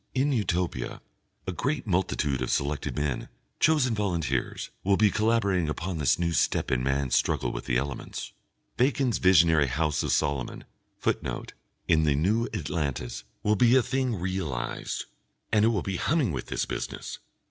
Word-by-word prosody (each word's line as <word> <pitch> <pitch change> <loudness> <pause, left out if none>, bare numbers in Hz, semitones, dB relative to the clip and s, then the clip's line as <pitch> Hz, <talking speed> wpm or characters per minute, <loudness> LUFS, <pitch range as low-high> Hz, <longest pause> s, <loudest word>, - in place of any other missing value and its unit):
In 135 +3 +2
Utopia, 90 - -1 0.5
a - - -2
great 140 - -2
multitude 85 - 0
of 65 - -1
selected 70 0 -1
men, 75 -3 -2 0.3
chosen 150 -6 +3
volunteers, 85 - -1
will 100 0 +3
be 105 -2 +4
collaborating 105 -7 +2
upon 85 +2 -3
this 70 -4 +3
new 85 -1 0
step - - +1
in 65 -1 +2
man's 70 -1 +1
struggle - - +1
with - - -6
the - - +1
elements. 70 +1 -4 0.4
Bacon's 125 -2 +2
visionary 80 -5 +5
House 75 +3 0
of - - -1
Saloman 70 -3 -1 0.3
[Footnote: - - -2 0.3
In 80 - +4
The 75 -2 +3
New 105 - +2
Atlantis.] 70 -7 -3 0.2
will 105 +1 +3
be 120 +3 +5
a 130 - +5
thing 130 -2 0
realised, 90 -8 -3 0.5
and 105 -1 +4
it - - +5
will 110 -5 +1
be 95 -2 -2
humming 150 - +1
with 65 -4 -4
this - - -1
business. - - -5
85 Hz, 160 wpm, -27 LUFS, 70-110 Hz, 0.5 s, visionary